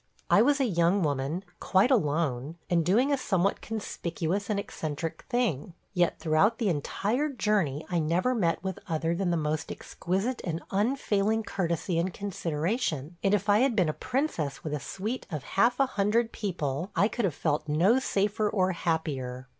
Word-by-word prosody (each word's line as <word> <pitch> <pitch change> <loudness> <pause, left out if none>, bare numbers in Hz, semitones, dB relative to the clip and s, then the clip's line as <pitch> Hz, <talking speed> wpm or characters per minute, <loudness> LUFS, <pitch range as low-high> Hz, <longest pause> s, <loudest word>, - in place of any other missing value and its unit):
I 205 - +7
was 285 +4 +3
a 270 - +3
young 180 -2 +2
woman, 145 +4 -1 0.2
quite 195 +8 +3
alone, 150 - +1
and 170 -1 +3
doing 230 - +3
a - - +2
somewhat 195 -5 0
conspicuous 200 -3 -3
and 205 -2 +1
eccentric 160 -5 -5
thing, 200 - -1 0.2
yet 175 -2 +2
throughout 160 +8 +2
the 225 -5 +1
entire 210 - 0
journey 200 - 0
I 175 - 0
never 170 +10 +1
met 180 -9 0
with 190 -1 -3
other 165 +1 0
than 180 +1 0
the 170 - +1
most 155 0 -2
exquisite 195 +8 -2
and 165 -1 -3
unfailing 215 -1 +1
courtesy 170 -3 -1
and 180 +2 0
consideration; 170 - -2
and 195 +1 +4
if 205 0 -2
I 205 +1 +5
had 255 -1 +3
been 180 -6 +3
a - - 0
princess 245 - -2
with 155 - -3
a 150 - -1
suite 210 - -4
of 155 -5 -4
half 235 - +2
a 275 - +5
hundred 225 0 +1
people 170 -5 -3
I 205 - +4
could 235 0 -1
have 170 -7 -1
felt 155 -1 -1
no 180 - +4
safer 210 -3 0
or 190 -3 +2
happier. 135 -7 -2
185 Hz, 175 wpm, -28 LUFS, 160-215 Hz, 0.2 s, I